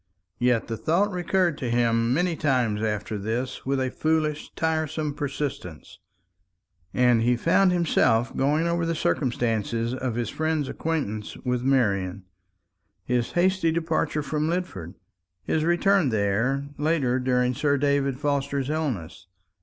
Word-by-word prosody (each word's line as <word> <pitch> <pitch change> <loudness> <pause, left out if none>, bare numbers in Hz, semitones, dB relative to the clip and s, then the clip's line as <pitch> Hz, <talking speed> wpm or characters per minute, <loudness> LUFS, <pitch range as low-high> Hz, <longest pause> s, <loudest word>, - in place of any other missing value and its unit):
Yet 125 -2 +2
the 115 - -3
thought 190 - +1
recurred 180 -3 0
to 125 - -2
him 115 -1 +2
many 175 +5 +1
times 125 -9 +1
after 105 -1 -2
this 120 +6 -3
with 135 0 +1
a 130 -1 -1
foolish 155 -1 -1
tiresome 160 -2 -1
persistence; 140 - -5 0.9
and 125 -2 +3
he 120 +1 +2
found 180 +7 +3
himself 135 -9 +2
going 150 +4 +1
over 170 0 0
the 165 0 -1
circumstances 115 -4 -1
of 130 -2 -3
his 120 -3 -2
friend's 155 -2 -1
acquaintance 135 -11 -3
with 125 -1 0
Marian, 100 -8 +1 0.8
his 120 +2 -1
hasty 180 -1 +2
departure 160 -2 -1
from 150 +2 -1
Lidford, 170 - -4 0.5
his 155 - 0
return 175 -1 +3
there 115 +6 0
later 145 -5 +1
during 125 0 +1
Sir 145 +2 +1
David 140 -1 +1
Forster's 140 -1 -1
illness. 110 - -3
135 Hz, 130 wpm, -25 LUFS, 120-160 Hz, 0.9 s, and